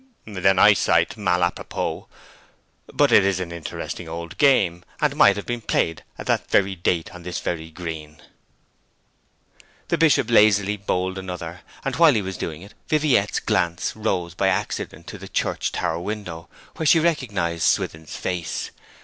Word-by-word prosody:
"' - - -41
'Then 95 -2 +1
I 105 +2 +8
cite - - +2
mal 90 -4 +1
a 85 - +3
propos. - - -4 0.9
But - - +3
it - - +7
is 95 -1 +1
an 90 -2 -4
interesting 85 0 -6
old 85 +1 -6
game, 95 - +3 0.2
and 150 -2 +1
might 100 -9 +6
have 105 - -6
been 120 -1 -3
played 80 -6 -1
at - - -7
that - - 0
very 95 0 +2
date 85 -1 -1
on 90 - -10
this 90 0 -4
very 80 -2 -4
green.' 80 -2 -7 1.7
The - - +1
Bishop 145 -7 +3
lazily 105 -2 +4
bowled 95 -1 -2
another, 90 -2 -7 0.2
and 135 -2 -1
while 165 -5 +6
he 105 - +1
was 95 0 -5
doing 80 +1 -5
it 100 - -14
Viviette's 145 -10 +2
glance 85 -1 -1
rose 95 -6 -2
by 95 +1 0
accident - - -2
to - - -9
the - - -10
church - - -1
tower - - -2
window, 90 -4 -6 0.3
where 160 - -1
she 165 - +6
recognized 105 - -1
Swithin's 80 -1 -1
face. 90 -3 -3
95 Hz, 165 wpm, -23 LUFS, 85-105 Hz, 1.7 s, I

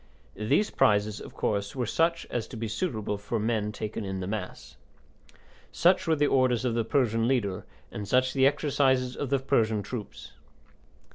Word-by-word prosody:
These 140 - +1
prizes, 105 0 +2
of - - -11
course, 100 +1 -2
were 125 -2 -1
such 165 +8 +1
as 115 -2 -2
to 120 - -9
be 115 0 -3
suitable 110 - -2
for 105 +3 -3
men 110 -1 0
taken 105 +1 -5
in 95 -1 -4
the 90 - -4
mass. 105 +3 -6 1.0
Such 180 +1 +3
were 160 - +3
the 145 -1 +2
orders 130 -3 +2
of 120 - +1
the 115 0 +1
Persian 115 -2 +1
leader, 105 -8 -1 0.2
and 105 -1 -6
such 130 +4 +2
the 135 -1 +5
exercises 130 -3 +1
of 140 - -4
the 140 - +3
Persian 115 -6 +1
troops. 110 0 -7
115 Hz, 170 wpm, -28 LUFS, 105-135 Hz, 1.0 s, the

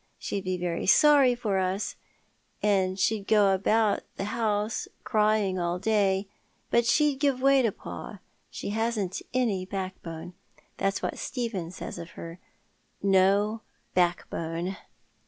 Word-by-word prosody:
She'd 195 -1 -4
be 185 0 -1
very 175 -1 -2
sorry 280 +1 +6
for 210 -5 -1
us, 190 +2 -1 0.7
and 190 -2 +2
she'd 200 +1 0
go 205 -3 +5
about 210 +2 +2
the - - -4
house 215 -1 -1 0.2
crying 215 -4 +2
all 175 0 -1
day, 195 -1 +1 0.4
but 235 0 +3
she'd 295 -1 +3
give 280 -3 +2
way 275 +1 +5
to 230 -4 +2
pa. - - -8 0.3
She - - -6
hasn't 215 -3 -1
any 230 -7 0
backbone. 185 -3 -6 0.4
That's 195 0 -1
what - - -3
Stephen 230 -9 -3
says 180 - -7
of 170 0 -8
her, 165 +1 -8 0.6
'No 200 +3 +3 0.3
back 175 -1 +2
bone.' 170 +3 -3
200 Hz, 135 wpm, -27 LUFS, 185-225 Hz, 0.7 s, sorry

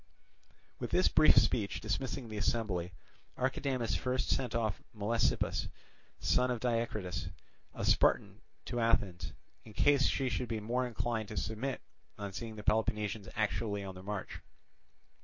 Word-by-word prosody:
With - - -3
this - - +4
brief - - +6
speech 100 - +3
dismissing 120 +3 -2
the 110 -1 -6
assembly, 100 -5 0 0.5
Archidamus 130 -2 0
first 130 0 -1
sent 125 -4 0
off 110 -4 0
Melesippus, 110 +2 +1 0.5
son 125 0 +3
of 125 -2 0
Diacritus, 115 -6 -1 0.5
a - - -2
Spartan, - - +3 0.2
to 120 - -2
Athens, 100 -6 +1 0.3
in 110 - -12
case 140 +4 +4
she 135 - +1
should 120 0 -1
be 110 -2 -1
more 125 +4 0
inclined 115 -2 -2
to 105 - -7
submit 120 +5 -2 0.4
on 100 -1 -5
seeing 110 +2 -5
the 105 - -8
Peloponnesians 105 -1 0
actually 105 -1 0
on 95 -1 -6
the 90 - -10
march. 100 0 -5
110 Hz, 140 wpm, -33 LUFS, 105-120 Hz, 0.5 s, brief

